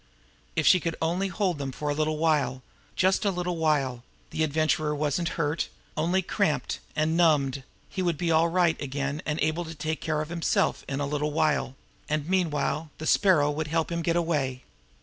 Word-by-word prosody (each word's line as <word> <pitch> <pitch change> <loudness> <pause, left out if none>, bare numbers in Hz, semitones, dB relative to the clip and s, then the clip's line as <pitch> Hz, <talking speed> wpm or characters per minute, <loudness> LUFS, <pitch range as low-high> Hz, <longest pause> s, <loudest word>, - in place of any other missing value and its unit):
If 160 - +1
she 185 - +7
could 165 -1 -2
only 175 +4 0
hold 185 -4 -1
them 140 -1 -3
now 130 - -9
for 150 - -2
a - - +1
little 155 +1 0
while 145 -5 +1 0.3
just 190 +1 +2
a 205 - +3
little 180 -2 -2
while 140 -6 +1 0.3
the 160 - 0
Adventurer 155 0 +1
wasn't 150 +3 0
hurt 150 0 0 0.3
only 175 +4 +1
cramped 175 -4 0 0.2
and 155 +1 +1
numbed 145 -5 +3 0.3
he 190 - -4
would 175 -4 0
be 170 +1 0
all 160 +1 +4
right 170 -1 +2
again 140 +1 -3
and 150 0 -1
able 155 +3 +1
to 165 -1 -8
take 155 +1 -3
care 155 -2 0
of 155 - -10
himself 170 -1 0
in 135 0 -2
a - - 0
little 150 +1 -1
while 150 -3 +1 0.3
and 155 0 -1
meanwhile 160 -4 0
the 155 - -6
Sparrow 160 -6 +4
would 155 +1 -3
help 160 +2 0
him 170 - -1
to - - -6
get 170 - +3
away. 145 -7 0
155 Hz, 200 wpm, -27 LUFS, 150-170 Hz, 0.3 s, she